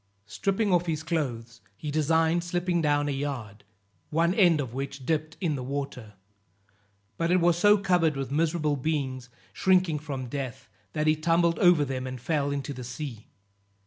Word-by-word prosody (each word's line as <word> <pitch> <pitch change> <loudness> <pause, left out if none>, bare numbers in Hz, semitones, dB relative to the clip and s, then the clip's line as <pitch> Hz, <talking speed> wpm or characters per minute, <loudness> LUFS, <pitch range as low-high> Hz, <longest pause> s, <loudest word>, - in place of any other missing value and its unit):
Stripping 195 - 0
off 175 0 +2
his 155 -1 -2
clothes, 120 -8 -3 0.2
he 150 - -5
designed 160 +3 +2
slipping 175 0 0
down 145 -1 +2
a - - 0
yard, 135 -7 -4 0.5
one 165 +3 +2
end 175 -6 +4
of 130 -5 -4
which 135 0 -5
dipped 155 +1 -1
in 170 -6 0
the 135 - -3
water; 130 -4 -5 1.0
but 165 0 0
it 180 +1 +4
was 170 0 +4
so 205 +4 +5
covered 175 -6 +2
with 135 -1 -4
miserable 155 0 +1
beings, 130 -3 -2 0.2
shrinking 185 - +2
from 140 -4 -5
death, 130 0 -5 0.3
that 155 0 -1
he 155 0 +4
tumbled 165 +1 +2
over 175 -5 +5
them 130 -1 -4
and 130 -1 -6
fell 145 +2 0
into 140 0 -3
the 130 -1 -7
sea. 120 -2 -7
150 Hz, 170 wpm, -27 LUFS, 135-170 Hz, 1.0 s, so